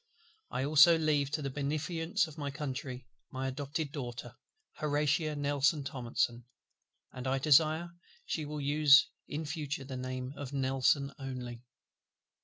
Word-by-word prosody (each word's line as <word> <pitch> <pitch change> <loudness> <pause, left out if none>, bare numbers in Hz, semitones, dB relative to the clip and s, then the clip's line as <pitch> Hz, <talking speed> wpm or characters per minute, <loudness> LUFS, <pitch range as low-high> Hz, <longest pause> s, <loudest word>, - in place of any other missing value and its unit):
"I 130 - -2
also 155 +3 +7
leave 150 -3 +1
to 150 +1 -2
the 135 - -3
beneficence 160 +7 -1
of 155 -3 -11
my 145 -2 -4
Country 130 -3 -5 0.2
my 130 0 -3
adopted 140 +2 -3
Daughter, 120 -4 -6 0.4
HORATIA 150 +1 +1
NELSON 145 +1 +1
THOMPSON; 120 -3 -2 0.7
and 125 +1 -5
I 135 +1 +1
desire 155 +4 +4 0.3
she 155 - -2
will 150 0 -5
use 145 0 +6 0.2
in 155 +2 -4
future 145 -2 -4
the 130 -1 -6
name 130 +1 -4
of 140 -1 -7
NELSON 135 +1 +1
only. 125 -3 -6
140 Hz, 135 wpm, -32 LUFS, 130-150 Hz, 0.7 s, also